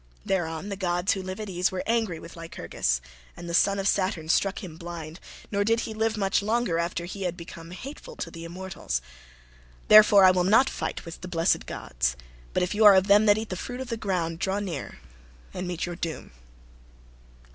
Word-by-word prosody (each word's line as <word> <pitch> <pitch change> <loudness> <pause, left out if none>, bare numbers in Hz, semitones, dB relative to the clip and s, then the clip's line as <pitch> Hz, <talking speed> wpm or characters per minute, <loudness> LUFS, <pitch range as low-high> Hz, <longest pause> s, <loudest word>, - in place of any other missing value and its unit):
Thereon 175 0 -1
the 200 - -3
gods 180 -1 0
who 195 - -4
live 185 +1 -6
at 215 - -5
ease 180 0 0
were 185 - -3
angry 225 -7 0
with 165 - -11
Lycurgus 60 - -2 0.4
and 175 - -8
the 170 - -4
son 200 +3 +4
of 195 0 -1
Saturn 185 -6 0
struck 195 +4 +1
him 170 -4 -8
blind, 170 -1 -8 0.3
nor 200 -1 +1
did 225 +2 +2
he 225 - -5
live 220 0 0
much 195 -1 +1
longer 215 -5 0
after 170 0 -2
he 195 +3 -7
had 180 -2 -2
become 170 -1 -10
hateful 275 - -9
to - - -5
the 165 -1 -9
immortals. 175 - -4 0.9
Therefore 210 -2 +9
I 185 - +8
will 180 -1 +2
not 220 +8 +4
fight - - -4
with 165 0 -9
the 180 - -6
blessed 165 -1 +1
gods; - - -2 0.4
but - - +1
if 180 - -1
you 215 +1 +2
are 205 -2 +10
of 190 0 +4
them 205 +2 +5
that 205 0 +6
eat 220 0 -4
the 185 - -3
fruit 245 +7 -6
of 260 -2 -6
the 230 - -1
ground, 175 -6 -2
draw 190 +2 0
near 180 -8 -5 0.6
and 180 0 -4
meet 175 -1 -2
your 175 0 -5
doom." 165 -3 -5
185 Hz, 210 wpm, -26 LUFS, 170-205 Hz, 0.9 s, are